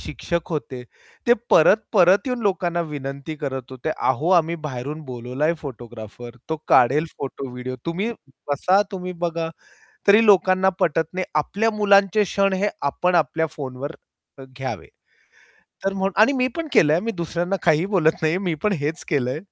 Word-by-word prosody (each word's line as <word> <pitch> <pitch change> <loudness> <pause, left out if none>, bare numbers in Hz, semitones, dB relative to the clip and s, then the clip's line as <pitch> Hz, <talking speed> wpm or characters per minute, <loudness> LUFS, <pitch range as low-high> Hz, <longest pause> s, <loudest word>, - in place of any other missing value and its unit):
शिक्षक 170 +2 -4
होते. 135 -5 -4 0.4
ते 240 - +6 0.2
परत-परत 190 - +5
येऊन 250 -1 -1
लोकांना 180 -4 0
विनंती 140 +2 -5
करत 135 -3 -5
होते. 130 +4 -4
"अहो, 140 +7 0
आम्ही 165 0 -1
बाहेरून 140 +3 -5
बोलावलं 125 +2 -4
आहे 165 +2 +2
फोटोग्राफर, 120 -2 -9
तो 160 - -1
काढेल 130 +5 +5
फोटो, 135 -1 -5
व्हिडिओ. 125 +1 -6
तुम्ही 185 +7 -1 0.4
बसा, 185 +7 +3
तुम्ही 180 -1 -5
बघा." 165 -1 -3 0.6
तरी 210 +3 +7
लोकांना 190 -2 +5
पटत 160 -1 +1
नाही. 185 0 -2
आपल्या 205 +9 +1
मुलांचे 200 0 +4
क्षण 195 0 +1
हे 205 - +2 0.2
आपण 180 +4 0
आपल्या 160 -1 +2
फोनवर 140 +2 -6 0.4
अ, 135 - -8
घ्यावे. 130 -10 -5 1.0
तर 195 - +1
म्हणून 195 0 -1
आणि 225 +6 +6
मी 255 -2 +1
पण 330 - -3
केलंय. 155 0 +5
मी 230 +3 -3
दुसऱ्यांना 175 +1 -2
काहीही 160 +1 +3
बोलत 180 -6 +3
नाहीये. 160 +3 +2
मी 180 -4 -1
पण 210 - +2
हेच 155 +4 -3
केलंय. 135 -2 0
165 Hz, 155 wpm, -22 LUFS, 135-190 Hz, 1.0 s, तरी